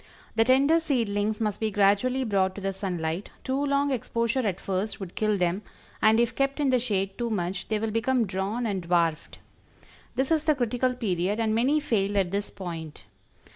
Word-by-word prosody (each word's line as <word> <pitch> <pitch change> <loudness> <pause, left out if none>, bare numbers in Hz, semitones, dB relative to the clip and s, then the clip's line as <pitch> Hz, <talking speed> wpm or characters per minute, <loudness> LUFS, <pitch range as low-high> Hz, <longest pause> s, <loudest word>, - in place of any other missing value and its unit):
The 225 - +5
tender 275 +6 +4
seedlings 220 -8 0
must 210 -3 -1
be 220 - 0
gradually 205 +6 +2
brought 195 -5 +1
to 200 - -7
the 195 0 -2
sunlight; 180 -2 -3
too 265 +2 -1
long 280 0 +1
exposure 235 0 -1
at 200 -7 -1
first 195 +2 -3
would 190 -3 -7
kill 215 -1 +1
them, 180 +2 0 0.4
and 220 +1 +5
if 235 -1 +2
kept 275 +1 0
in 280 -3 +2
the 255 - +4
shade 195 -5 -1
too 240 -1 -1
much 180 -3 -2
they 215 - 0
will 220 +1 -2
become 230 +2 +1
drawn 200 +5 -2
and 200 -4 -1
dwarfed. 170 -2 0 0.8
This 265 +3 0
is 310 -1 +2
the 305 -1 +4
critical 250 0 0
period, 200 -3 -1
and 220 -1 +1
many 260 +7 +3
fail 205 -8 0
at 185 -3 +1
this 200 +1 -2
point. 165 - -7
215 Hz, 190 wpm, -27 LUFS, 195-250 Hz, 0.8 s, The